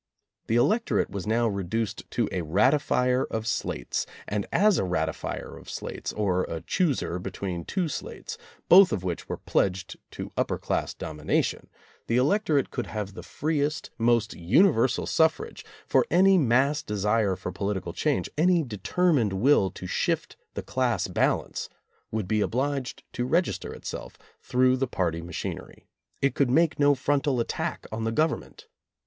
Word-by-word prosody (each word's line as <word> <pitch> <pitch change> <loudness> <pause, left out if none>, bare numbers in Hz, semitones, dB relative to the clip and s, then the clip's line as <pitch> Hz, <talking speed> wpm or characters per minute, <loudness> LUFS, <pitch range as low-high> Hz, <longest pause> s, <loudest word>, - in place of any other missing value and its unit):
The 115 - +1
electorate 215 - +2
was 100 +1 -5
now 115 +2 +2
reduced 100 +2 -3
to 115 -3 0
a 90 - -1
ratifier 125 - +2
of 110 0 -3
slates, 60 - -2 0.2
and 105 -1 -2
as 205 0 +4
a - - +1
ratifier 80 -3 -3
of - - -13
slates, - - -5
or 95 -4 +1
a 80 -1 -5
chooser 145 - 0
between 90 -1 -4
two 180 -3 -1
slates, 455 - -6 0.3
both 185 +1 +8
of 95 - -2
which 90 -2 -4
were - - -3
pledged 95 -1 -1 0.2
to - - -6
upper - - 0
class - - -2
domination, 75 -1 -2 0.4
the 115 - +2
electorate 150 0 +2
could 125 - -3
have 105 -2 -4
the - - -8
freest, 150 -1 -2
most 115 -1 +2
universal 125 - +3
suffrage, 160 - +1 0.2
for - - +3
any 195 +1 +5
mass 140 0 +3
desire 105 -4 +1
for 90 0 -5
political 95 -4 -3
change, 150 +7 0
any 175 0 +4
determined 120 - +1
will 100 -1 +4
to 95 - -9
shift - - -1 0.2
the - - -4
class - - 0
balance, - - 0 0.4
would 110 -4 -3
be 110 +1 +1
obliged 135 +4 -2
to 120 - -2
register 165 +8 0
itself - - -7 0.2
through 130 +1 +3
the 135 +1 0
party 85 -7 -1
machinery. 85 -1 -6 0.4
It 140 - +3
could 140 -3 +2
make 160 +4 +3
no 145 0 +5
frontal 140 0 +1
attack 115 - -3
on 110 +1 -3
the 115 - 0
Government. 155 +6 -1
120 Hz, 155 wpm, -27 LUFS, 100-145 Hz, 0.4 s, both